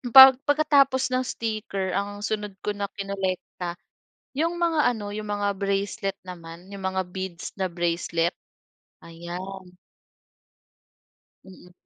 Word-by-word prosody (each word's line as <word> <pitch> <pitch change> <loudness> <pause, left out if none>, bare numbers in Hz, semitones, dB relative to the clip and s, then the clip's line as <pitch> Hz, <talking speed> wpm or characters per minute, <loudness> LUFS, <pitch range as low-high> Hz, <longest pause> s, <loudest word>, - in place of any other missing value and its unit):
pag 265 -1 +13
pagkatapos 285 -3 +4
ng 255 - +2
sticker 215 -5 -2
ang 205 +1 -2
sunod 210 -2 -2
ko 210 - 0
na 200 0 -2
kinolekta, 190 -3 -3 0.6
'yong 335 +3 +1
mga 335 -2 +2 0.2
ano 205 -1 -5
'yong 215 - -4
mga 205 0 0
bracelet 200 0 -1
naman, 170 0 -9
'yong 200 -1 -7
mga 190 0 0
beads 190 -2 -5
na 190 - +2
bracelet. 170 0 0 0.7
Ayan. 180 +2 -8 1.7
Mm. 180 -1 -15
195 Hz, 115 wpm, -26 LUFS, 180-215 Hz, 1.7 s, pag